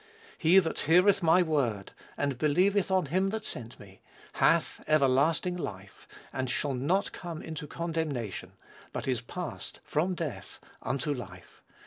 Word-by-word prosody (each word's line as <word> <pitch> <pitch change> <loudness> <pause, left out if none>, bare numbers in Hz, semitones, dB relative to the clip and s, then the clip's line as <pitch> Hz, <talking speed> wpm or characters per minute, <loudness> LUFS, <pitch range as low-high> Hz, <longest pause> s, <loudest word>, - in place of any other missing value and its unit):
"He 170 +4 +5
that 165 -4 +3
heareth 185 +4 +5
my 170 +2 +5
word, 125 - -1 0.3
and 140 -3 -1
believeth 180 +6 +3
on 190 -2 +2
him 185 +7 +1
that 220 +2 -3
sent 115 0 -3
me, 95 -1 -15 0.3
hath - - +2
everlasting 155 +5 +3
life, 100 - -7 0.3
and 130 -1 -2
shall 140 +2 0
not 150 +10 0
come 170 -3 -7
into 155 -2 -6
condemnation; 155 - -3 0.4
but - - -4
is 125 -3 0
passed 175 +7 -6
from 175 +5 0
death 140 - -5 0.2
unto 140 +2 -1
life." 95 -8 -10
155 Hz, 140 wpm, -29 LUFS, 130-180 Hz, 0.4 s, He